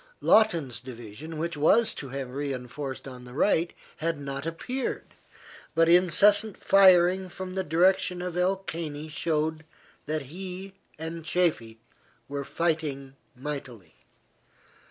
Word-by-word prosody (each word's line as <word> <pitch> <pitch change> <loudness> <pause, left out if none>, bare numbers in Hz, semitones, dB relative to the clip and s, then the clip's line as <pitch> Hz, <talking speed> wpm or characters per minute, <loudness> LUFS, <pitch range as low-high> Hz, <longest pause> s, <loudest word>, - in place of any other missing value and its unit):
Lawton's 165 - +3
division, 125 +5 -9
which 170 +1 -2
was 160 +10 +4
to 135 - -7
have 135 -1 -5
re 140 +1 -2
enforced 130 +2 -6
on 125 -2 -9
the 125 0 -11
right, 170 +1 +2 0.3
had 165 -1 -2
not 140 +1 -5
appeared, 250 +11 -4 0.6
but 165 0 +4
incessant 195 +5 +5
firing 185 -1 +5
from 185 +1 -7
the 190 0 -1
direction 180 +3 +2
of 180 -1 -4
El 185 +2 +2
Caney 160 -5 -5
showed 155 0 -1 0.4
that 155 -1 -1
he 185 +6 -7 0.2
and 160 +1 -6
Chaffee 155 -10 0 0.5
were 140 0 -4
fighting 145 -4 -2 0.2
mightily. 125 - -7
160 Hz, 125 wpm, -27 LUFS, 140-180 Hz, 0.6 s, incessant